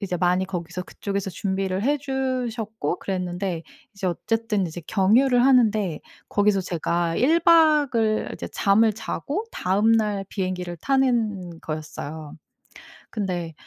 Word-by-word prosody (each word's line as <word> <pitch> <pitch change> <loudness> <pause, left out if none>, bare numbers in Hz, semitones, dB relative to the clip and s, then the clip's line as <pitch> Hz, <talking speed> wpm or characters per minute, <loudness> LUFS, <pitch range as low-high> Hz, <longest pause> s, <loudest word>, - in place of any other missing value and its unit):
이제 180 -4 -3
많이 180 +1 +2
거기서 180 -1 -5
그쪽에서 200 0 -4
준비를 190 +1 -2
해 290 +4 +2
주셨고 250 - -2
그랬는데 180 -2 -3 0.3
이제 200 -1 -4
어쨌든 215 +1 -1
이제 170 +1 -7
경유를 240 +6 +4
하는데 220 - +3 0.3
거기서 205 -1 +2
제가 170 -1 -1
1 315 +7 +3
박을 295 -11 +4
이제 - - -6
잠을 215 +3 +3
자고 280 - -4
다음날 205 +1 +1
비행기를 180 -2 -3
타는 220 -10 0
거였어요. 155 0 -6 0.7
근데 180 -6 -3
200 Hz, 275 characters per minute, -24 LUFS, 180-230 Hz, 0.7 s, 경유를